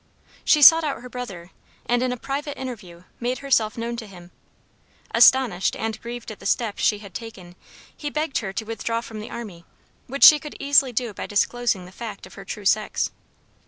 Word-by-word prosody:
She 300 -2 +4
sought 325 +4 +9
out 285 -5 -3
her 250 - -9
brother, 195 -9 -8 0.3
and 245 0 +1
in 255 0 0
a 250 - -3
private 280 +4 -4
interview 195 -10 -8 0.2
made 245 +2 -2
herself 225 -6 +2
known 235 +1 -4
to 225 -2 -7
him. 175 -2 -14 0.8
Astonished 235 -5 +4
and 220 0 -4
grieved 235 -1 -7
at 215 - -10
the 195 - -5
step 225 -1 -1
she 210 - +2
had 200 -3 -12
taken 190 -6 -9 0.4
he 295 - -5
begged 305 -1 -1
her 195 -4 -5
to 220 +3 -5
withdraw 230 +1 -3
from 220 -2 -9
the 215 - -8
army, 200 -8 -8 0.4
which 275 +3 -2
she 300 - +10
could 300 -1 -9
easily 280 -2 +4
do 235 -2 -2
by - - -6
disclosing 205 -2 0
the 180 - -13
fact 210 -1 -8
of 185 - -15
her 195 - -10
true 205 0 -7
sex. 215 +2 +1
230 Hz, 195 wpm, -23 LUFS, 200-255 Hz, 0.8 s, she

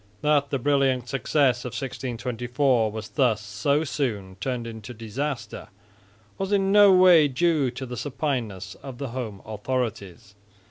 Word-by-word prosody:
That 145 -1 +2
the 135 - 0
brilliant 135 -2 +1
success 135 -1 +1
of 125 - -6
1624 125 -1 -1
was 110 0 -7
thus 125 -7 +2
so 105 +9 0
soon 105 -11 -3
turned 125 -3 -2
into 115 +1 -8
disaster 120 +5 -5 0.7
was 195 +1 -2
in 195 -1 +2
no 205 -1 +7
way 180 -4 +7
due 150 0 +1
to 125 +2 -6
the 125 0 -6
supineness 125 - -3
of 135 -3 -8
the 140 -1 -4
home 115 -5 -6
authorities. 110 -3 -4
125 Hz, 140 wpm, -25 LUFS, 115-145 Hz, 0.7 s, no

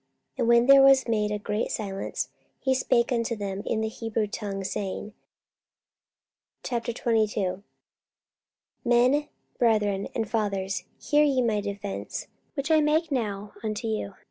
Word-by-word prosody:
And 245 -3 0
when 235 0 +6
there 275 +1 +8
was 270 -1 +6
made 210 -2 +1
a 210 - -1
great 210 +1 -2
silence, 195 -3 -3 0.3
he 265 - +1
spake 240 -2 +2
unto 230 -1 0
them 200 -2 -4
in 220 - 0
the 220 - 0
Hebrew 225 0 -2
tongue, 200 -1 -4
saying, 200 +2 -4 1.5
44:022:001 220 -5 0 1.2
Men, 250 +4 +3 0.3
brethren, 210 -4 +2
and 225 -2 -1
fathers, 200 -3 -1
hear 295 0 +3
ye 275 -3 +2
my 215 -3 +1
defence 200 0 -5 0.3
which 285 +2 -2
I 310 -1 +6
make 310 +2 +2
now 210 -5 -2
unto 215 +1 -3
you. 215 -3 -3
220 Hz, 135 wpm, -27 LUFS, 205-245 Hz, 1.5 s, there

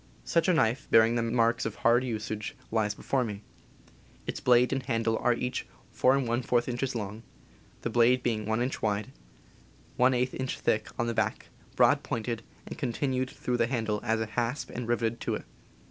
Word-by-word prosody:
Such 165 +1 +2
a 185 - +4
knife, 120 -2 +1
bearing 115 +1 +6
the 120 - +1
marks 115 0 +2
of 110 -2 -3
hard 120 +2 +3
usage, 110 -3 -4 0.2
lies 105 -2 +1
before 130 +3 0
me. 105 -3 -5 0.8
Its - - -4
blade 125 +1 +4
and 135 - 0
handle 115 -3 0
are 120 -1 +2
each 125 +1 -3 0.3
4j 125 -2 +2
inches 125 +1 -2
long, 105 0 -4 0.6
the - - -1
blade 125 +1 +4
being 110 -3 -1
1 110 +2 +1
inch 130 - -3
wide, 105 -1 -1 0.9
J 125 0 +4
inch 130 0 -3
thick 110 0 +1
on 120 - 0
the 115 - -1
back, - - -1 0.3
broad - - +5
pointed, 115 0 -3 0.2
and - - -8
continued 130 +1 -1
through 125 -2 -2
the 115 - +2
handle 110 -4 -1
as 115 -1 0
a 110 - 0
hasp 120 +4 -2
and 125 -1 -5
riveted 115 -1 0
to - - -1
it. - - -7
120 Hz, 175 wpm, -29 LUFS, 110-125 Hz, 0.9 s, bearing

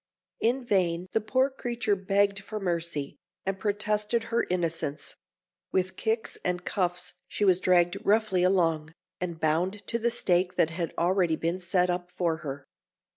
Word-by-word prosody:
In 245 +3 +1
vain 180 -4 +1
the 220 - +1
poor 260 +5 +2
creature 240 -5 -1
begged 200 +1 +1
for 210 +2 -6
mercy, 170 -6 -2 0.3
and 195 0 -2
protested 210 +2 0
her 235 - +2
innocence: 165 -5 -2 0.6
with 185 0 0
kicks 220 0 -1
and 180 0 -1
cuffs 180 -1 -1
she 205 - -1
was 185 -2 +5
dragged 175 0 +3
roughly 210 -3 +3
along, 165 -4 +2 0.2
and 175 -2 -4
bound 175 +6 0
to 235 - -1
the 235 +1 +2
stake 180 -5 +1
that 160 - +3
had 170 0 -3
already 175 -1 +2
been 170 +3 -1
set 180 0 +2
up 175 0 -3
for 170 -3 -1
her. 140 -3 -6
185 Hz, 155 wpm, -28 LUFS, 170-210 Hz, 0.6 s, was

